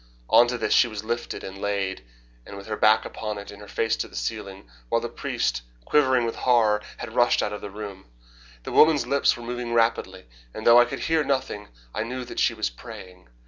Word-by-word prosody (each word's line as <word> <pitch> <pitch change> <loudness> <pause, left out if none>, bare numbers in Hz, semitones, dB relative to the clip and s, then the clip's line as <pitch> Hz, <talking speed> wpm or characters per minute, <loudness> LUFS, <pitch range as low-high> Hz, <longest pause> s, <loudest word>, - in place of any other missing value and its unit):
On 120 - +7
to 125 0 -2
this 115 - 0
she 120 - +5
was 110 -2 -6
lifted 120 +2 -4
and 95 0 -8
laid, 100 -5 -2 0.5
with 100 0 -9
her 110 - -3
back 110 +1 +4
upon 105 -1 -5
it, 100 - -8
and 100 0 -12
her 105 - -11
face 115 +2 0
to - - -3
the - - -15
ceiling, 100 - -5 0.2
while - - +2
the - - -4
priest, - - -2 0.2
quivering 130 -5 +3
with 115 - -3
horror, 110 -4 +3 0.2
had 120 -2 -7
rushed 120 0 +3
out 105 - -2
of 105 - -6
the 105 - -6
room. 100 -1 -8 0.6
The - - -6
woman's 155 -2 +5
lips 140 -2 +2
were 120 - -9
moving 120 0 -4
rapidly, 115 -5 0 0.3
and 110 - -7
though 120 +1 +8
I 120 - +6
could 120 - -6
hear 160 -1 +1
nothing 130 -7 -2 0.3
I - - -2
knew 125 +3 -4
that - - -6
she - - +2
was - - -1
praying. 90 +8 -11
110 Hz, 220 wpm, -25 LUFS, 100-120 Hz, 0.6 s, though